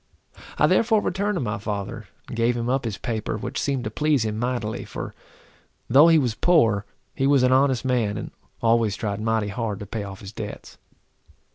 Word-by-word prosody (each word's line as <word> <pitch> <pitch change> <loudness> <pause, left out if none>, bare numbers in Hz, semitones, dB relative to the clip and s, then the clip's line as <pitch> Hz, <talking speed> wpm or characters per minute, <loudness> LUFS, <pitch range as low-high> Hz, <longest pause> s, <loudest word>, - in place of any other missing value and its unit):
I - - +5
therefore 225 -1 +3
returned 205 +1 -1
to - - -1
my 105 -5 -2
father, 105 +2 -5 0.2
and - - -7
gave 120 +1 +1
him 120 +1 -2
up 130 0 0
his 105 -4 -3
paper, 110 -2 -3
which 120 +5 -4
seemed 135 -3 -1
to - - -4
please 150 -6 +1
him 110 0 -2
mightily, 120 -3 -2
for - - -7 0.7
though 140 +6 +7
he 165 -1 +6
was 125 -7 +1
poor, 115 - +3 0.3
he 135 - 0
was 140 -2 +4
an 125 - +4
honest 130 -1 +3
man, 115 -5 +1
and - - -6 0.3
always 115 -3 +3
tried 105 -2 -3
mighty 110 -1 0
hard 110 -1 -3
to 105 - -6
pay 105 +2 -4
off 100 -1 -8
his 100 -1 -8
debts. - - -8
115 Hz, 195 wpm, -24 LUFS, 105-135 Hz, 0.7 s, though